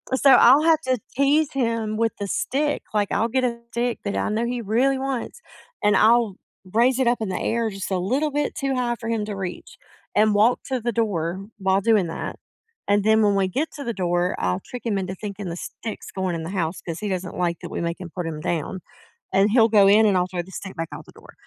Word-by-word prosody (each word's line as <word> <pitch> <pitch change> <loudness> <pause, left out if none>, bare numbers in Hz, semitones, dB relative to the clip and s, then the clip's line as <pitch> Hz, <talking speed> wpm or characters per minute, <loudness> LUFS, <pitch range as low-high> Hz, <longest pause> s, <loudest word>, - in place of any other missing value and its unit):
So, 275 +1 +5
I'll 265 +4 +7
have 320 -1 +4
to 255 -1 +1 0.2
tease 285 +2 +2
him 230 -4 -1
with 225 -1 +1
the 200 - -3
stick. 290 +8 -1
Like, 205 -1 +1
I'll 225 +3 +1
get 260 +2 0
a 235 -1 -2
stick 240 0 -1
that 200 - -2
I - - 0
know 220 +2 0
he 245 0 -2
really 245 +6 +2
wants, 270 - -4 0.4
and 210 - +4
I'll 225 -2 +4 0.4
raise 245 +3 +3
it 260 - +2
up 240 +1 +2
in 215 - -2
the 185 - -2
air 230 0 0
just 195 -1 -6
a 185 - +1
little 270 +11 0
bit 290 0 -1
too 275 -1 -1
high 245 -1 0
for 225 - -6
him 225 -2 0
to 210 -1 -5
reach 190 -2 -6 0.4
and 215 0 +4
walk 220 +4 +4
to 260 -3 -2
the 240 - -1
door 195 -5 -1
while 190 0 +2
doing 210 -4 +3
that, 165 - -5 0.5
and 205 0 +3
then 220 +1 +4
when 205 -1 +3
we 195 -1 +2
get 270 - -2
to 290 - -6
the 235 -2 -3
door, 175 -1 0
I'll 90 0 -1
trick 250 - -8
him 215 -4 0
into 190 -1 -3
thinking 200 -2 -6
the 170 - -5
stick's 220 +4 -7
going 190 -2 -2
in 160 - -4
the 165 - -5
house 175 -3 -2
'cause 165 -1 -6
he 210 - -3
doesn't 185 -2 -4
like 175 -1 0
that - - -7
we - - -3
make 170 +2 -3
him 180 - -7
put 180 -2 -3
'em 155 -2 -5
down, 170 +3 -2 0.5
and 195 +2 +4
he'll 230 -1 +5
go 205 -3 +6
in, 215 +2 +6
and 195 -3 +3
I'll 180 - +2
throw 180 -1 -3
the 190 - -15
stick 190 +1 -7
back 165 -1 -4
out - - -9
the - - -15
door. - - -16
215 Hz, 250 wpm, -23 LUFS, 190-240 Hz, 0.5 s, I'll